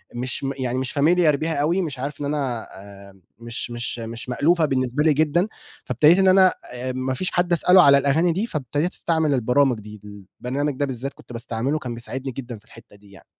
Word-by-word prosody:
مش 125 Hz, +3 st, -2 dB
م 135 Hz, -, -1 dB
يعني 130 Hz, -1 st, -2 dB
مش 130 Hz, -1 st, -3 dB
familiar 160 Hz, 0 st, +4 dB
بيها 160 Hz, +3 st, -2 dB
أوي 160 Hz, +6 st, +1 dB
مش 145 Hz, -7 st, -5 dB
عارف 145 Hz, +2 st, -5 dB
إن -, -, -2 dB
أنا 135 Hz, -6 st, -2 dB, 0.4 s
آمم 95 Hz, -, -24 dB, 0.2 s
مش 115 Hz, +1 st, -5 dB
مش 120 Hz, 0 st, -3 dB
مش 115 Hz, +2 st, -7 dB
مألوفة 160 Hz, +6 st, +2 dB
بالنسبة 130 Hz, 0 st, 0 dB
لي 155 Hz, -1 st, +4 dB
جدًا، 160 Hz, +6 st, +1 dB, 0.4 s
فابتديت 150 Hz, -, +4 dB
إن 190 Hz, -, +4 dB
أنا 185 Hz, 0 st, +6 dB, 0.2 s
آآ، 125 Hz, +1 st, -4 dB
ما 130 Hz, +1 st, -2 dB
فيش 180 Hz, +8 st, -2 dB
حد 175 Hz, 0 st, +1 dB
أسأله 180 Hz, +2 st, +6 dB
على 140 Hz, 0 st, +7 dB
الأغاني 155 Hz, +5 st, +2 dB
دي 190 Hz, +7 st, -1 dB
فابتديت 150 Hz, -, -2 dB
أستعمل 160 Hz, -3 st, 0 dB
البرامج 125 Hz, 0 st, +2 dB
دي 105 Hz, -1 st, -12 dB, 0.4 s
البرنامج 140 Hz, +4 st, -2 dB
ده 145 Hz, -, +2 dB
بالذات 135 Hz, +1 st, -5 dB
كنت -, -, -14 dB
باستعمله 120 Hz, +5 st, -2 dB
كان 125 Hz, -5 st, -6 dB
بيساعدني 130 Hz, +3 st, -6 dB
جدًا 120 Hz, -2 st, -7 dB
في 110 Hz, -, -26 dB
الحتّة 115 Hz, -2 st, -17 dB
دي 100 Hz, -1 st, -20 dB
يعني. 95 Hz, -, -17 dB
135 Hz, 205 wpm, -22 LUFS, 120-155 Hz, 0.4 s, على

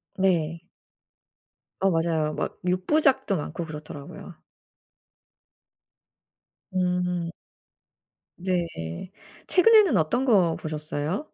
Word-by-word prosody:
네. 170 Hz, -4 st, +1 dB, 1.2 s
어 195 Hz, -1 st, +3 dB
맞아요. 160 Hz, -2 st, 0 dB
막 -, -, -3 dB
6 185 Hz, 0 st, 0 dB
부작도 275 Hz, -9 st, +3 dB
많고 165 Hz, +3 st, -4 dB
그렇더라고요. 150 Hz, -2 st, -9 dB, 2.4 s
음. 180 Hz, -1 st, 0 dB, 1.1 s
네. 170 Hz, -, -3 dB, 0.4 s
최근에는 405 Hz, -, +6 dB
어떤 230 Hz, +12 st, +1 dB
거 185 Hz, -9 st, +4 dB
보셨어요? 155 Hz, -, -3 dB
175 Hz, 160 characters per minute, -26 LUFS, 155-195 Hz, 2.4 s, 최근에는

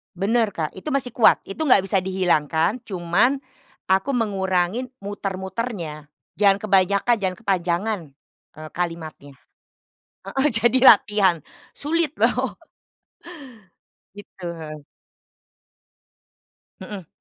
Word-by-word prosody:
Benar, 210 Hz, +2 st, +1 dB
Kak. 155 Hz, -2 st, -2 dB
Itu 270 Hz, +10 st, -6 dB
masih 255 Hz, -3 st, -1 dB
kuat, 235 Hz, -, +4 dB
itu 195 Hz, -, -9 dB
enggak 250 Hz, -8 st, +5 dB
bisa 195 Hz, 0 st, +1 dB
dihilangkan. 180 Hz, -, 0 dB
Cuman 190 Hz, +9 st, +1 dB, 0.5 s
aku 190 Hz, +9 st, +2 dB
mengurangin 195 Hz, +1 st, 0 dB, 0.2 s
muter-muternya. 190 Hz, -5 st, -5 dB, 0.3 s
Jangan 200 Hz, -1 st, +4 dB
kebanyakan, 200 Hz, +3 st, +3 dB
jangan 185 Hz, -2 st, -2 dB
kepanjangan, 185 Hz, +3 st, 0 dB, 0.6 s
eee, 155 Hz, 0 st, -9 dB
kalimatnya. 160 Hz, -5 st, -5 dB, 0.9 s
Heeh, 270 Hz, +2 st, 0 dB
jadi 235 Hz, +3 st, +3 dB
latihan, 205 Hz, -4 st, +4 dB, 0.4 s
sulit 315 Hz, 0 st, -1 dB
loh. -, -, +1 dB, 1.6 s
Gitu, 200 Hz, -2 st, -14 dB, 0.2 s
heeh. 155 Hz, -1 st, -7 dB, 2.0 s
Mhm. 190 Hz, -3 st, -8 dB
195 Hz, 95 wpm, -22 LUFS, 175-225 Hz, 2.0 s, enggak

